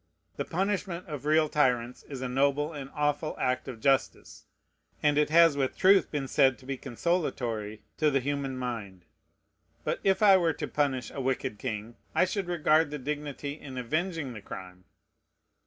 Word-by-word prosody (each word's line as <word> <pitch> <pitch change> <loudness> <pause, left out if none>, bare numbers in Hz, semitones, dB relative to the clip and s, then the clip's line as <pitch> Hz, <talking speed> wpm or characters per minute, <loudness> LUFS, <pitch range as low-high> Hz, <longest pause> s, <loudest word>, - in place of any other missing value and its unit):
The 140 - -2
punishment 190 -1 -2
of 150 -3 -6
real 155 0 +4
tyrants 125 -5 +1
is 135 -3 -8
a - - -1
noble 140 +4 +1
and 140 -2 -7
awful 150 +1 0
act 125 +1 -1
of 125 -4 -7
justice; 135 +3 0 0.6
and 150 -1 +4
it 150 0 +3
has 165 -1 +6
with 135 -2 -1
truth 195 +1 +5
been 145 -3 -3
said 135 -2 +3
to 130 - -17
be 135 +1 -3
consolatory 120 - -2
to 155 - +3
the 135 -1 +2
human 140 0 -2
mind. 105 -8 -5 0.8
But - - -1
if 195 +1 +2
I 195 -2 +8
were 170 -3 +2
to - - -4
punish 140 -4 -1
a 140 - -5
wicked 130 -4 -2
king, 115 -2 -5 0.2
I - - +5
should 190 0 -3
regard 160 -2 +3
the 150 - -4
dignity 145 0 -4
in 130 -3 -9
avenging 155 +2 -2
the 110 - -8
crime. 90 -1 -10
140 Hz, 170 wpm, -29 LUFS, 125-155 Hz, 0.8 s, I